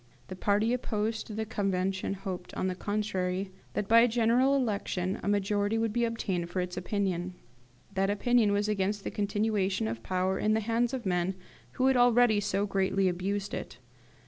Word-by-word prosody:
The 185 - -5
party 205 +5 +1
opposed 220 -2 -2
to 215 - -7
the 220 0 -2
Convention 195 -2 -1
hoped, 185 -2 -6
on - - -1
the 185 - 0
contrary, 190 -1 -2 0.2
that, 205 - -2
by 230 +2 +7
a 235 - +6
general 245 +4 +3
election, 200 -7 -1
a - - -5
majority 205 +1 +1
would 225 -1 0
be 240 0 +2
obtained 190 -7 -2
for 185 - -3
its 180 0 -3
opinion. 185 -2 -2 0.6
That 195 0 +1
opinion 220 +1 +3
was 205 +1 +1
against 205 0 -1
the - - -4
continuation 205 - 0
of 115 +1 -4
power 185 +3 -1
in 215 0 +2
the - - +2
hands 230 +3 0
of 250 - -6
men 180 0 0 0.4
who 255 - 0
had 265 -1 +4
already 245 -3 +5
so 200 0 0
greatly 195 -1 +1
abused 195 +3 -2
it. - - -5
205 Hz, 180 wpm, -29 LUFS, 190-225 Hz, 0.6 s, by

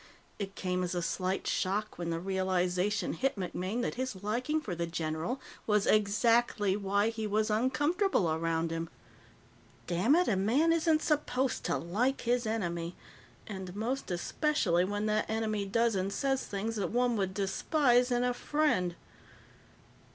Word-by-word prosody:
It 195 -1 -5
came 180 -1 -1
as 180 0 -2
a 175 - 0
slight 185 +2 -1
shock 205 +1 -1
when 170 -1 -2
the 165 0 -1
realization 185 +1 0
hit 270 +1 0
MacMaine 190 +4 -3
that - - -1
his 220 -7 -4
liking 250 +9 0
for 210 -12 -5
the 170 0 -2
general 165 +8 -2 0.3
was 210 -2 +3
exactly 215 -1 +3
why 200 +1 +1
he 220 -1 -3
was 215 +1 +1
uncomfortable 280 - +2
around 165 0 0
him. 165 0 -3 1.0
Dammit, 235 - +3
a 205 - +2
man 255 - +3
isn't 320 -1 +2
supposed 270 -4 0
to - - +1
like 230 +11 0
his 240 -1 +1
enemy 175 -6 -2 0.5
and 190 -3 -7
most 245 +6 -2
especially 180 - +1
when 205 +2 -2
that 215 0 0
enemy 215 -2 -1
does 230 +3 +2
and 190 0 -1
says 270 +5 -1
things 215 +3 -3
that 190 -4 -1
one 245 +1 +1
would 190 -3 -1
despise 245 +5 +2
in 245 0 +1
a 250 0 +1
friend. 245 - 0
210 Hz, 150 wpm, -31 LUFS, 185-245 Hz, 1.0 s, was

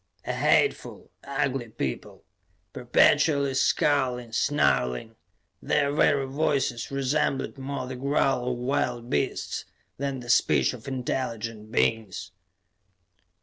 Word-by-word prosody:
A - - -2
hateful, 425 - +1
ugly 135 -3 -2
people, 70 - -5 0.5
perpetually 140 +3 +3
scowling, 130 -3 +1
snarling; 60 - +1 0.5
their 140 - +1
very 145 -2 +3
voices 135 -4 -1
resembled 135 0 -1
more 135 -1 -4
the 130 0 -6
growl 135 -1 +1
of 125 - -3
wild 125 -1 -2
beasts 70 - -1 0.3
than 140 -1 -3
the 120 - -10
speech - - +3
of 125 -1 -11
intelligent 115 -4 -4
beings. 105 -5 0
130 Hz, 105 wpm, -26 LUFS, 120-140 Hz, 0.5 s, perpetually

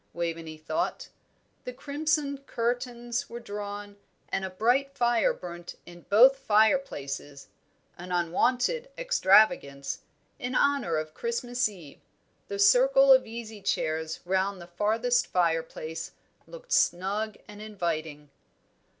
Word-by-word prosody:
Waveney 165 -2 -4
thought. 320 - -3 0.5
The 250 - -6
crimson 285 +1 -1
curtains 240 -1 -3
were 235 - -7
drawn, 205 -2 -7 0.3
and 195 - -2
a 190 - -3
bright 250 +8 +1
fire 240 -2 +3
burnt 175 -1 -8
in 175 0 -14
both 240 +7 +8
the 270 - -30
fireplaces 175 - 0 0.5
an 180 +1 -8
unwonted 245 - +1
extravagance 190 - +3 0.4
in 250 +1 -4
honour 280 - +2
of 155 0 -4
Christmas 240 +2 -1
Eve; 170 -8 -13 0.5
the 200 - -4
circle 265 +6 +6
of 260 - +3
easy 220 -2 -8
chairs 160 -2 -2
round 190 +1 0
the 175 - -9
farthest 225 +7 +1
fireplace 165 -2 -2 0.3
looked - - -12
snug 210 - +1
and 210 0 -11
inviting. 160 -8 -4
210 Hz, 115 wpm, -28 LUFS, 175-250 Hz, 0.5 s, both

